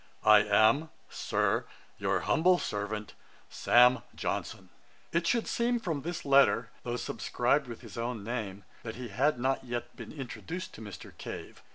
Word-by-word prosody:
'I 105 -1 +8
am, 110 +9 +4 0.2
Sir, - - 0 0.3
'Your - - +1
humble 180 +3 +4
servant, 105 - -4 0.4
'SAM. 125 +1 +5 0.2
JOHNSON.' - - -4 0.4
It 170 0 +1
should 235 +3 +2
seem 240 +1 +1
from 165 -10 -2
this 170 +3 -5
letter, 135 -4 +4
though 120 0 -3
subscribed 125 +3 0
with 120 -2 -8
his 115 -3 -9
own 115 -2 -3
name, 105 -4 -4 0.2
that 110 -1 -6
he 125 0 -7
had 130 +6 +1
not 135 +2 0
yet 120 -1 -5
been - - -9
introduced 160 +6 -6
to - - -11
Mr. 100 -6 -10
Cave. - - -8
125 Hz, 155 wpm, -30 LUFS, 110-150 Hz, 0.4 s, I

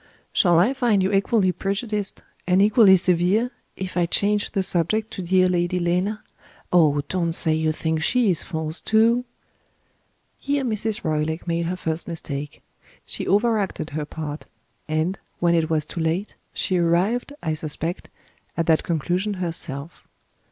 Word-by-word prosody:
Shall 175 -3 +4
I 200 +10 +4
find 235 -7 +2
you 190 - 0
equally 195 -1 +2
prejudiced, 200 +2 -3 0.2
and 185 +1 +4
equally 205 -1 +6
severe, 185 +6 +2 0.2
if 190 -1 -6
I 175 -1 +2
change 205 +3 +1
the 195 -2 -1
subject 185 +6 0
to - - -5
dear 185 +1 +3
Lady 175 0 0
Lena? 180 +5 0 0.5
Oh, 150 -5 +4
don't 170 -3 -1
say 160 -1 +2
you 155 0 +1
think 160 0 -2
She 235 +3 +3
is 165 - -1
false, 160 -1 -4
too!" 230 +3 +3 1.1
Here 280 0 -1
Mrs. 220 -3 -1
Roylake 155 +1 -1
made 170 0 0
her 180 - -2
first 160 -2 -3
mistake. 150 -4 -6 0.4
She - - -5
over 220 +3 +3
acted 190 -5 -3
her 150 0 -3
part; 150 0 -6 0.4
and, 160 +5 -1 0.2
when 170 -1 +3
it 165 -1 +1
was 155 -2 +1
too 170 - -7
late, 165 +5 -1 0.2
she 185 -3 -1
arrived, 185 +11 +1
I 160 - 0
suspect, 155 +2 -4 0.5
at 165 - +1
that 160 -1 +3
conclusion 180 +5 -1
herself. 165 -4 -5
180 Hz, 155 wpm, -23 LUFS, 160-205 Hz, 1.1 s, equally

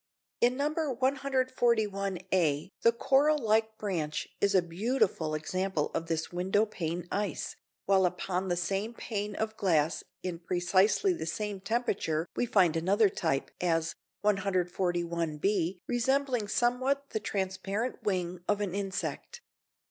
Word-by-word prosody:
In 245 +1 +3
No. 290 +2 0 0.2
141 245 -7 +1
a 160 -2 +1
the 230 - +6
coral 280 +6 +3
like 220 -3 +1
branch 165 -7 -2
is 200 0 +3
a 185 - +5
beautiful 175 -3 0
example 185 +1 -1
of 165 - -2
this 165 -1 -2
window 190 +4 +2
pane 175 -4 -4
ice, 200 -5 -2 0.3
while 190 -2 +4
upon 180 +1 -2
the 175 - +1
same 195 +6 -2
pane 210 -3 -4
of 220 0 -2
glass 165 -4 +2 0.2
in 175 -2 -3
precisely 185 - +2
the 245 - -5
same 205 +3 -3
temperature 195 -7 -1
we 245 - 0
find 180 -7 +4
another 195 +6 +3
type, 160 -7 -1
as 165 -1 +1 0.3
141 175 -5 0
b 185 +1 +1
resembling 250 -2 +1
somewhat 260 +5 +1
the 220 - -1
transparent 195 +4 -2
wing 180 -3 -1
of 205 -1 +2
an 200 -4 -2
insect. 190 -6 -4
195 Hz, 135 wpm, -30 LUFS, 175-220 Hz, 0.3 s, the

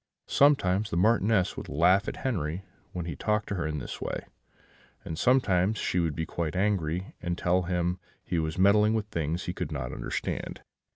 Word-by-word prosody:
Sometimes 110 -8 +3
the 85 - -2
Marchioness 105 -1 +3
would - - -7
laugh 90 +7 +3
at - - -6
Henri 90 - -1 0.3
when 90 -2 -4
he 85 - -4
talked 105 0 0
to - - -1
her 85 -5 -1
in 75 -1 -3
this 65 - -6
way; - - -4 0.8
and 80 - -4
sometimes 105 -2 +3
she 90 - 0
would 80 -4 0
be 80 - -2
quite 80 0 -3
angry, 95 -3 0
and 85 0 -2
tell 90 +1 +2
him 90 0 -1 0.3
that - - -30
he 85 - +2
was 80 0 -2
meddling 105 +3 +5
with 110 -2 -1
things 85 +1 -2
he 90 - -3
could 80 - -4
not 65 -4 -4
understand. - - -4
90 Hz, 190 wpm, -28 LUFS, 85-105 Hz, 0.8 s, meddling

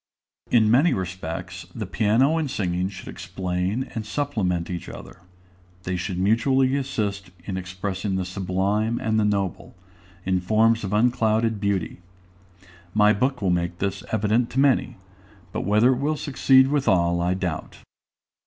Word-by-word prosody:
In 110 -3 +4
many 140 +9 +4
respects, 90 0 -5
the 110 -3 -4
piano 115 - +2
and 150 -3 -2
singing 90 -4 -1
should 95 -1 -10
explain 90 +6 -3
and 110 - -3
supplement 105 -8 -1
each 90 -2 -5
other. - - -11 0.6
They 90 0 -2
should 90 +1 -3
mutually 130 +7 +2
assist 105 -8 -2 0.2
in 95 - -4
expressing 95 +2 -3
the 95 -1 -1
sublime 95 +4 -1
and 110 0 0
the 105 - +2
noble, 100 -3 -2 0.5
in 95 -1 +1
forms 110 +4 +3
of 95 - -3
unclouded 110 -1 +2
beauty. 100 -4 -1 1.0
My 105 0 +5
book 125 +2 -1
will 95 - +2
make 85 0 -1
this 100 +1 -3
evident 110 +3 +1
to 135 - -2
many; 135 -3 +2 0.5
but - - -3
whether 105 +5 +4
it 125 - -3
will 150 +2 0
succeed 135 -1 +4
with 145 -1 0
all, 85 -2 +3
I 90 +1 +1
doubt. 90 -4 -4
105 Hz, 150 wpm, -24 LUFS, 95-120 Hz, 1.0 s, My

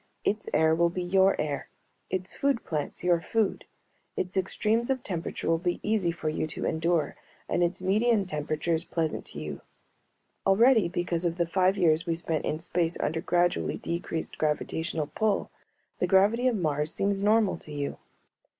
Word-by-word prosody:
Its 210 +1 -1
air 160 +1 +4
will 170 +1 +3
be 180 +1 -3
your 190 +2 +3
air; 145 -2 -2 0.4
its 185 0 -3
food 275 -4 0
plants 150 -3 -3
your 175 -2 +3
food. 220 +3 0 0.5
Its 185 +1 -2
extremes 215 +5 0
of 260 -2 0
temperature 170 -4 -4
will 165 0 +3
be 175 0 -1
easy 205 -5 +1
for 165 -2 -5
you 155 0 -1
to 155 - -4
endure 165 0 0 0.3
and 175 - +1
its 180 +2 -1
median 210 +2 +3
temperatures 155 0 -1
pleasant 165 -3 -2
to - - -9
you. 75 -2 -6 0.9
Already, 220 +1 +5
because 175 -1 -1
of 170 -1 -1
the 170 - +2
five 185 +3 +2
years 165 -3 +3
we 165 - +1
spent 165 -2 -2
in 155 - -1
space 170 0 -1
under 160 +2 -1
gradually 175 0 +1
decreased 170 -1 -4
gravitational 155 +1 -1
pull, 215 +7 -1 0.5
the - - +1
gravity 210 +6 +4
of 250 - +2
Mars 150 -5 0
seems 200 0 0
normal 210 0 +3
to 155 - -13
you. 145 -1 -4
175 Hz, 170 wpm, -28 LUFS, 160-195 Hz, 0.9 s, Already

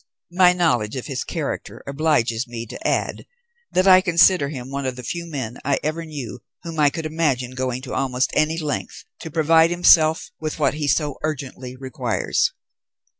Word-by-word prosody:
My 180 0 +6
knowledge 145 -12 +1
of 130 - -5
his 135 -4 -3
character 160 -5 -5
obliges 140 -5 0
me 115 -1 -6
to 320 - -5
add - - -1 0.4
that 185 - +2
I 185 -1 +8
consider 170 -4 +4
him 130 -3 -7
one 140 -1 -3
of 130 - -3
the 125 - -9
few 170 +4 -4
men 130 -7 -5
I 140 - +1
ever 155 +2 -2
knew 140 -6 -7 0.2
whom 165 -2 -6
I 145 -1 +5
could 160 +2 -5
imagine 150 -6 0
going 130 0 -3
to 130 - -6
almost 130 -1 0
any 155 +1 +1
length 150 -4 -4
to 160 - -7
provide 160 +1 +4
himself 165 -2 +4
with 155 -1 -4
what 150 - +2
he 150 -1 -3
so 145 -1 0
urgently 130 -4 -5
requires. 130 -1 -1
150 Hz, 175 wpm, -22 LUFS, 130-165 Hz, 0.4 s, I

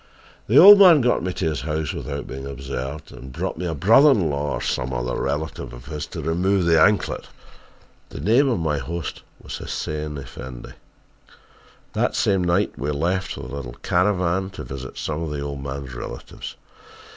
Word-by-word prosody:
"The - - +4
old 200 +2 +11
man 175 -7 +8
got 125 0 +2
me 90 +2 -2
to 90 - -3
his 75 -5 -1
house 75 0 -2
without 70 -2 -5
being 65 +1 -7
observed, 70 +1 -6
and 65 +2 -10
brought 80 - -4
a 85 -3 -2
brother 115 - +6
in 95 - +3
law 70 +1 -2
or - - -2
some 65 +1 -1
relative 70 +6 -3
of - - -11
his 75 -1 -5
to - - -7
remove 90 +4 +1
the 80 -2 +4
anklet. 105 +1 +2 0.8
The - - -8
name 115 - +3
of 120 - +1
my 75 -4 -1
host 85 +3 -5 0.2
was - - -7
Hussein 75 -1 -4
Effendi. 65 -1 -9 1.2
"That - - 0
same 95 -2 +2
night 90 +4 +1
we 70 +2 -2
left 85 +6 -1
with 65 -1 -7
a - - -5
little 65 -4 -7
caravan 90 0 +1
to 75 - -5
visit 65 0 -8
some 80 +1 -3
of 80 - -3
the 75 -1 -4
old 70 -1 -5
man's 70 -1 -6
relatives. - - -8
75 Hz, 180 wpm, -23 LUFS, 70-90 Hz, 1.2 s, old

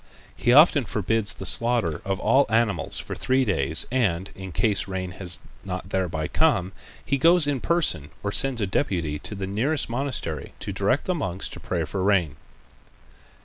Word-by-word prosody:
He 120 - +1
often 145 -1 +6
forbids 105 +2 -1
the 95 - -8
slaughter 115 -7 +1
of 95 0 -2
all 135 +5 +3
animals 110 -8 0
for - - -5
three 130 0 +1
days 80 - 0
and, 95 -8 0
in 95 -1 -8
case 100 +4 +1
rain 95 -1 -4
has 90 -2 -3 0.3
not 95 -1 -5
thereby 85 -5 -1
come, 120 - +2 0.3
he 140 - 0
goes 170 +2 +5
in 145 -2 0
person 165 - +1
or 100 - -1
sends 130 +1 +2
a - - +2
deputy 85 - -1
to 105 - -8
the 95 -1 -4
nearest 115 +8 -1
monastery 120 - -3
to 100 - -5
direct 100 +8 +1
the 185 - 0
monks 95 - -3
to - - -9
pray 85 -3 -2
for 80 +6 -3
rain. 95 -7 +2
100 Hz, 175 wpm, -25 LUFS, 90-130 Hz, 0.3 s, often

